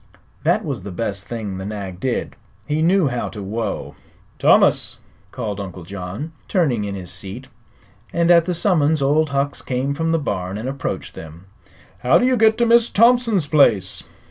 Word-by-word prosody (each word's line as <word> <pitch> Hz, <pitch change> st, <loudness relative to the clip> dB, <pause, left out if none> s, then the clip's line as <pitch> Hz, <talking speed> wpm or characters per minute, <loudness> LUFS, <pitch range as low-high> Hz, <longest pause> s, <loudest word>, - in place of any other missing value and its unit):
That -, -, +1 dB
was -, -, -3 dB
the 100 Hz, -, -7 dB
best 100 Hz, +1 st, -4 dB
thing 105 Hz, -5 st, -5 dB
the -, -, -5 dB
nag 100 Hz, -3 st, -6 dB
did. 125 Hz, +2 st, -2 dB, 0.3 s
He 150 Hz, +1 st, -1 dB
knew 175 Hz, -2 st, +3 dB
how 120 Hz, -1 st, -3 dB
to 105 Hz, -3 st, -8 dB
whoa. 110 Hz, +4 st, -4 dB, 0.5 s
"Thomas!" -, -, +3 dB, 0.3 s
called 105 Hz, -3 st, -5 dB
Uncle 95 Hz, -3 st, -7 dB
John, 100 Hz, -, -6 dB, 0.2 s
turning 135 Hz, -, +1 dB
in 100 Hz, -1 st, -4 dB
his 90 Hz, -2 st, -7 dB
seat; 100 Hz, +8 st, -7 dB, 0.6 s
and 170 Hz, 0 st, +2 dB
at 170 Hz, -1 st, +6 dB
the 180 Hz, 0 st, -1 dB
summons 160 Hz, -5 st, +2 dB
Old 150 Hz, +3 st, +2 dB
Hucks 140 Hz, 0 st, -1 dB
came 130 Hz, +2 st, -2 dB
from 165 Hz, +3 st, -1 dB
the 165 Hz, -, +2 dB
barn 95 Hz, -, -3 dB
and 115 Hz, +4 st, -5 dB
approached 135 Hz, +1 st, -4 dB
them. 80 Hz, +3 st, -11 dB, 0.5 s
"How 125 Hz, -, +4 dB
do -, -, +2 dB
you 255 Hz, 0 st, +3 dB
get 220 Hz, -1 st, +4 dB
to 235 Hz, -, +3 dB
Miss 235 Hz, 0 st, +4 dB
Thompson's 230 Hz, -5 st, +3 dB
place?" 140 Hz, -11 st, +3 dB
130 Hz, 175 wpm, -20 LUFS, 100-165 Hz, 0.6 s, at